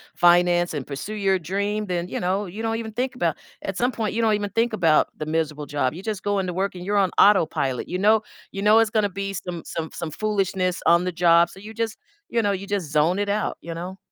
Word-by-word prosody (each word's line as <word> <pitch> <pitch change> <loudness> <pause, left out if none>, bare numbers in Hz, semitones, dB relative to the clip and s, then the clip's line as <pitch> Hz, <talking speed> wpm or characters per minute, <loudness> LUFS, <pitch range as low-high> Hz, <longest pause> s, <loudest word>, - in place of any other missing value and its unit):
finance 175 0 +4
and 140 -3 -4
pursue 150 +10 -6
your 195 -2 +1
dream, 200 +5 -2
then, 175 -1 -2
you - - -4
know, 190 +3 0
you 200 +4 -7
don't 225 0 -1
even 225 -1 -5
think 255 +4 -2
about 170 -10 0 0.3
at 195 - -3
some 245 +6 +1
point, 220 -5 -2
you 230 - 0
don't 220 -1 +3
even 205 -1 -3
think 230 +1 +1
about 165 -7 +3
the 155 - -4
miserable 155 -1 -2
job. 145 -2 -1
You 180 - -8
just 210 -3 -3
go 205 0 0
into 185 -2 -2
work 190 +2 -2
and 180 0 -7
you're 205 +1 +1
on 195 -2 +3
autopilot, 155 - +3
you 180 - -3
know 215 +3 +4 0.3
you 195 - -5
know, 210 +2 +5
it's 225 -1 +2
gonna 215 -3 +2
be 195 +1 -4
some 180 -3 -5
some 160 -1 -4
some 165 -2 -5
foolishness 190 -2 -1
on 170 +1 +5
the 180 - -1
job, 170 0 +4
so 190 - -13
you 215 +3 -10
just, 225 -1 -3 0.3
you 235 - +1
know, 205 - +2
you 200 0 -4
just 195 -7 -2
zone 155 +5 +3
it 205 0 -1
out, 210 +1 -1
you 170 - -6
know. 180 +3 -6
190 Hz, 250 wpm, -23 LUFS, 170-210 Hz, 0.3 s, know